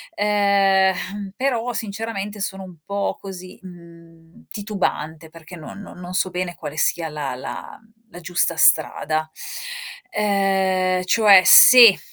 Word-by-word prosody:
ehm, 200 -1 0
però 245 -2 -2
sinceramente 210 -1 -6
sono 195 -1 -5
un 185 -2 -13
po' 200 0 -3
così, 185 -2 -10
mhmm, 170 -2 -17
titubante 165 -6 -5
perché 165 +2 -14
non 165 +4 -11
non 205 - -12
non 180 0 -9
so 185 0 -1
bene 180 -1 -5
quale 150 -1 -9
sia 165 0 -1
la 150 -3 -5
la 130 - -9 0.3
la 175 - -11
giusta 175 -1 -2
strada. 155 0 +1 0.9
Uhm, 190 -2 0
cioè 200 -1 +5
se, 235 -6 +8
190 Hz, 125 wpm, -20 LUFS, 170-200 Hz, 0.9 s, se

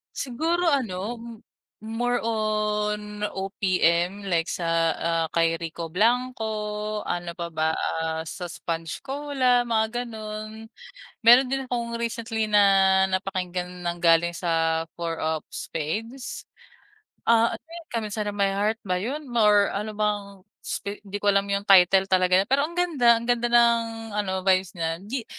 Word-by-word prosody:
Siguro 325 +6 0
ano, 230 -3 -2 0.6
more 240 +2 -1
on 210 -1 -1 0.2
OPM 190 -1 +1
like 165 -1 +1
sa, 165 -1 0
ah, 165 0 0
kay 165 0 +1
Rico 165 0 -6
Blanco, 215 -1 -1
ano 175 0 -4
pa 170 -2 -5
ba, 160 0 0 0.2
ah, 160 0 -2
sa 175 +2 -6
Sponge 165 +1 -5
Cola, 265 -3 +1
mga 220 -1 +2 0.2
gano'n. 215 0 -8 0.5
Meron 250 +3 +7
din 270 0 -2
akong 235 -2 -3
recently 230 -1 -2
na 210 -1 +4 0.5
napakinggan 180 -1 -3
nanggaling 170 0 +2
sa 165 -1 0
Four 165 -1 -4
of 160 0 -1
Spades. 225 - -5 0.8
Ah, 230 0 +4
ano - - -26
'yun, 335 0 -11
Come 230 -2 -3
Inside 210 -1 -2
of 205 - -5
My 200 -1 +2
Heart 210 +3 0
ba 180 -2 -1
'yun, 280 +9 -4
more 210 -5 +3
ano 210 +1 -4
bang 210 -1 0 0.5
sp 200 0 -4
'di 205 -1 -7
ko 205 0 +2
alam 200 0 +2
'yung 200 0 -1
title 190 -1 +6
talaga, 185 0 +3
pero 275 +5 +2
ang 340 - -12
ganda, 285 -10 +4
ang 230 - -4
ganda 240 0 +1
ng 230 -2 +2
ano 190 -2 -2
vibes 185 -1 +2
nya. 165 -1 -1
'Di 230 +5 -5
210 Hz, 145 wpm, -25 LUFS, 180-235 Hz, 0.8 s, Meron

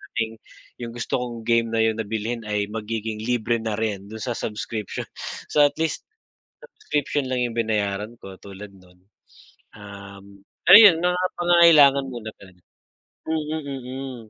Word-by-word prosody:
maging 110 0 -2 0.4
yung 115 -1 -5
gusto 120 +1 -2
kong 120 -2 -6
game 115 -1 +3
na 115 - +2
yun 110 0 +1
na 110 - -2
bilhin 110 +2 -3
ay 105 -1 -1
magiging 110 0 -4
libre 120 -1 0
na 110 -1 -2
rin 100 -3 -3
dun 110 +1 -8
sa 125 - -2
subscription. 105 -1 -5 0.5
So 150 - +1
at 145 - 0
least, 160 0 -2 0.6
subscription 150 - -3
lang 125 -1 0
yung - - -7
binayaran 105 -1 -1
ko 95 -1 -10
tulad 100 +1 -10
nun. 90 -1 -21 0.7
Um, 100 -1 -12 0.3
ayun 195 -4 +10
mga 180 0 +2 0.2
pangangailangan 165 -6 +6
muna 115 -3 -7
talaga. 95 -2 -17 0.7
Mm, 155 0 -2
mm. 130 -1 -6
115 Hz, 145 wpm, -23 LUFS, 105-135 Hz, 0.7 s, ayun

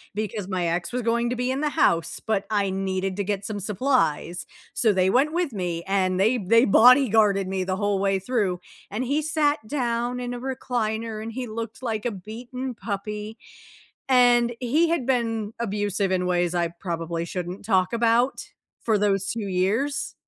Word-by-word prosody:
because 210 -2 -3
my 185 -3 -1
ex 170 +5 -2
was 250 - -1
going 235 +1 +1
to 250 - -1
be 250 +1 -1
in 265 - -1
the 300 - +1
house, 170 - +1
but 210 -3 0
I 205 -2 +1
needed 190 0 -2
to 200 - 0
get 200 0 -3
some 210 -2 -4
supplies. 200 - 0 0.3
So, 220 -3 +3
they 185 -1 +2
went 275 +9 +2
with 345 -3 0
me 175 -5 -3
and 185 -1 +1
they 220 +6 +3
they 230 +4 +4
bodyguarded 220 -4 +5
me 190 0 -1
the 185 0 -1
whole 205 0 0
way 195 0 +2
through, 195 -4 -1 0.3
and 215 +5 -3
he 285 +4 0
sat 305 -1 +1
down 240 -2 -1
in 245 0 -4
a 245 - -5
recliner 230 -4 -3
and 225 +1 -5
he 255 +1 -4
looked 230 +3 -6
like 220 -3 -2
a 240 - 0
beaten 240 +6 -6
puppy, 210 +1 -5 0.7
and 245 -2 +5
he 300 +7 +2
had 330 -8 0
been 225 -4 0
abusive 205 -3 -1
in 180 -1 0
ways 175 -1 +1
I 170 -1 +1
probably 170 -1 -4
shouldn't 180 +2 -5
talk 190 -2 +2
about 235 +3 +2 0.4
for 220 -2 +2
those 200 -1 +1
2 235 - -4
years 215 +10 0
215 Hz, 180 wpm, -24 LUFS, 190-245 Hz, 0.7 s, bodyguarded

